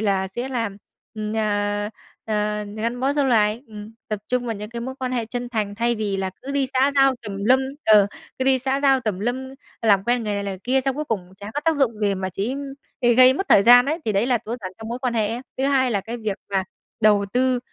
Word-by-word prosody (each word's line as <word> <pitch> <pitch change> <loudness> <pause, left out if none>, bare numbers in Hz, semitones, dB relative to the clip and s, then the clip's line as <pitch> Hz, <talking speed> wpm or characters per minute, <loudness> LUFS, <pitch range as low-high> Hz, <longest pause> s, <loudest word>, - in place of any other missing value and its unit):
là 195 -3 0
sẽ 240 +7 -5
làm, 230 -6 -2 0.4
ừm, 215 -1 -4
ờ, 205 -1 0 0.4
ờ, 210 -1 -1
gắn 230 +3 -2
bó 270 +2 +2
dâu 290 -1 +1
lài. 220 -2 +2
Ừm, 210 0 -10 0.2
tập 215 -2 -2
trung 250 -1 0
vào 230 - -2
những 210 +1 -7
cái 235 0 -5
mối 260 +3 -5
quan 255 -1 -3
hệ 240 -2 0
chân 245 +2 -4
thành, 215 -4 -2
thay 235 +2 +1
vì 210 -3 -2
là 190 -1 -2
cứ 275 - -6
đi 280 -1 +1
xã 265 +2 +2
giao 270 -1 +5
tùm 205 -3 -6
lum 260 +4 +5 0.2
ờ, 210 -2 +6 0.3
cứ 260 - 0
đi 265 0 +4
xã 265 +2 -1
giao 270 -2 +4
tùm 215 -6 -2
lum, 240 +5 -1 0.5
làm 200 -3 +4
quen 240 +1 +1
người 210 -1 -1
này, 200 0 -2
người 195 -1 -4
kia 265 +2 +2
xong 270 0 -1
cuối 300 - -2
cùng 190 -9 -4
chả 200 +2 -8
có 290 - -1
tác 325 -1 +2
dụng 240 -6 +1
gì 205 -2 +1
mà 190 0 -3
chỉ 200 +8 -2 0.5
gây 240 -1 +4
gây 255 +1 +8
mất 390 +7 -3
thời 195 - +7
gian 245 +3 +8
ấy, 310 +3 0
thì 215 - 0
đấy 200 +4 +1
là 250 -2 +2
tối 225 +2 -5
giản 185 -1 -6
trong 225 0 -8
mối 240 +2 -4
quan 250 -2 -2
hệ 220 -2 +2
ấy. 235 +2 -3 0.2
Thứ 265 - +1
hai 270 -2 +2
là 205 -4 0
cái 230 +5 -6
việc 215 -4 -3
mà 190 -1 0 0.4
đầu 210 -2 +4
tư 255 0 +2
230 Hz, 260 wpm, -22 LUFS, 210-255 Hz, 0.5 s, gây